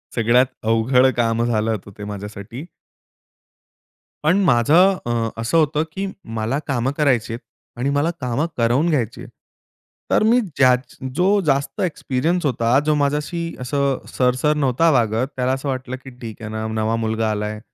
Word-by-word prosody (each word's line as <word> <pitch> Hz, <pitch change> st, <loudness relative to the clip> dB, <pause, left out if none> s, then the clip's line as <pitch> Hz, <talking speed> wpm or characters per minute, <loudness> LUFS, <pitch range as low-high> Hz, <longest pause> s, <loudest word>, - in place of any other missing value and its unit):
सगळ्यात 120 Hz, +2 st, +4 dB, 0.2 s
अवघड 115 Hz, +4 st, +3 dB
काम 115 Hz, -1 st, +1 dB
झालं 115 Hz, -1 st, 0 dB
होतं 105 Hz, -2 st, -5 dB
ते 105 Hz, -, -7 dB
माझ्यासाठी. 105 Hz, +5 st, -7 dB, 1.6 s
पण 160 Hz, +5 st, +3 dB
माझं 165 Hz, +7 st, +4 dB
अ, 115 Hz, -1 st, 0 dB
असं 115 Hz, +8 st, +1 dB
होतं 155 Hz, -1 st, +2 dB
की 195 Hz, +4 st, -3 dB, 0.3 s
मला 110 Hz, +5 st, -1 dB
काम 130 Hz, -2 st, 0 dB
करायची 125 Hz, -7 st, +1 dB
आहेत 115 Hz, -, -5 dB, 0.4 s
आणि 130 Hz, +3 st, 0 dB
मला 145 Hz, +3 st, +1 dB
कामं 125 Hz, +4 st, 0 dB
करवून 125 Hz, +8 st, +2 dB
घ्यायची 120 Hz, -8 st, -1 dB
आहेत. -, -, -10 dB, 0.8 s
तर -, -, +4 dB
मी 230 Hz, +3 st, +4 dB
ज्याच 130 Hz, -, +1 dB, 0.2 s
जो 180 Hz, -, +2 dB, 0.2 s
जास्त 140 Hz, -1 st, 0 dB
एक्सपिरियन्स 165 Hz, -1 st, -1 dB
होता, 120 Hz, -1 st, +2 dB
जो 155 Hz, -, +3 dB
माझ्याशी 150 Hz, +4 st, -1 dB, 0.2 s
असं, 140 Hz, +1 st, -1 dB
सर, 125 Hz, -1 st, +1 dB
सर 150 Hz, +4 st, +1 dB
नव्हता 140 Hz, +3 st, +2 dB
वागत, 115 Hz, -2 st, +1 dB
त्याला 125 Hz, 0 st, 0 dB
असं 135 Hz, +1 st, -3 dB
वाटलं 130 Hz, -1 st, -3 dB
की, 135 Hz, -, -9 dB
"ठीक 115 Hz, -1 st, -8 dB
आहे 105 Hz, -, -6 dB
ना, 110 Hz, 0 st, -4 dB
नवा 110 Hz, 0 st, -1 dB
मुलगा 110 Hz, -1 st, -1 dB
आलाय, 105 Hz, 0 st, -3 dB
125 Hz, 160 wpm, -21 LUFS, 115-145 Hz, 1.6 s, सगळ्यात